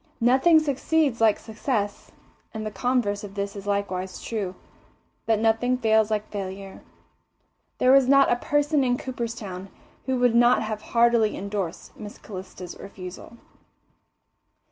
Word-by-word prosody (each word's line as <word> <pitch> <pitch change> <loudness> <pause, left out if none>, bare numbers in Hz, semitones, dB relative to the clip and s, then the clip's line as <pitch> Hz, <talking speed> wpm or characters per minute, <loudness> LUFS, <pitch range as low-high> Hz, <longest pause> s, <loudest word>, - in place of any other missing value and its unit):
Nothing 265 +7 +5
succeeds 290 -3 0
like 220 -2 +4
success, 215 -2 -3 0.4
and 215 0 -4
the 215 - -3
converse 205 -1 0
of 200 -1 -9
this 200 0 -3
is 200 0 -8
likewise 190 -2 -2
true 200 -5 -4 0.7
that 225 -1 +3
nothing 225 +3 +1
fails 220 -3 +3
like 215 -1 -2
failure. 195 -1 -6 1.0
There 255 - +4
was 270 -1 +6
not 275 0 +5
a - - +4
person 290 +2 +1
in 245 -1 +1
Cooperstown 230 -8 -6 0.4
who 260 -1 +1
would 245 -1 +3
not 240 0 +4
have 215 -1 -4
heartily 235 -2 +2
endorsed 195 -3 -5
Miss 210 -1 -9
Calista's 185 -2 -9
refusal. 190 +3 -10
220 Hz, 135 wpm, -25 LUFS, 200-250 Hz, 1.0 s, was